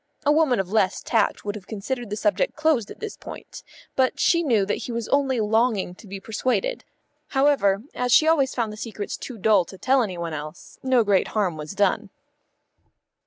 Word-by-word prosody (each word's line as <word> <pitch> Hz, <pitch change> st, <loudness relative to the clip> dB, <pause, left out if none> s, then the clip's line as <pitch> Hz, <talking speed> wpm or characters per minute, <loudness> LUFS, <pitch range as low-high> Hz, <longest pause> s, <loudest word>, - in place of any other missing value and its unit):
A 290 Hz, -, +5 dB
woman 300 Hz, -6 st, +3 dB
of 190 Hz, -1 st, -3 dB
less 200 Hz, -3 st, +1 dB
tact 225 Hz, -3 st, 0 dB
would 205 Hz, -, -2 dB
have 205 Hz, -3 st, -10 dB
considered 235 Hz, +2 st, -4 dB
the 210 Hz, -, -2 dB
subject 315 Hz, -, 0 dB
closed 305 Hz, -9 st, +1 dB
at -, -, -10 dB
this 435 Hz, -2 st, -6 dB
point, -, -, -10 dB, 0.3 s
but 260 Hz, -1 st, +1 dB
she 335 Hz, -, +3 dB
knew 230 Hz, -11 st, +2 dB
that 205 Hz, -, -1 dB
he -, -, -2 dB
was 230 Hz, -1 st, -3 dB
only 270 Hz, -3 st, +2 dB
longing 220 Hz, -3 st, +1 dB
to 205 Hz, -, -15 dB
be 195 Hz, 0 st, -6 dB
persuaded. 255 Hz, -, -1 dB, 0.4 s
However, 270 Hz, -8 st, +2 dB
as 250 Hz, 0 st, -1 dB
she 310 Hz, +6 st, +6 dB
always 280 Hz, -5 st, +3 dB
found 225 Hz, -4 st, -1 dB
the -, -, -10 dB
secrets 215 Hz, -2 st, -5 dB
too 250 Hz, -, -8 dB
dull 210 Hz, -2 st, +4 dB
to 190 Hz, -, -12 dB
tell 265 Hz, +6 st, +3 dB
any 190 Hz, -6 st, -3 dB
one 170 Hz, -1 st, -4 dB
else, 155 Hz, +2 st, -8 dB
no 260 Hz, -3 st, +3 dB
great 200 Hz, -3 st, +2 dB
harm 190 Hz, -6 st, +1 dB
was 155 Hz, +5 st, -7 dB
done. 205 Hz, +1 st, +1 dB
225 Hz, 200 wpm, -24 LUFS, 200-265 Hz, 0.4 s, she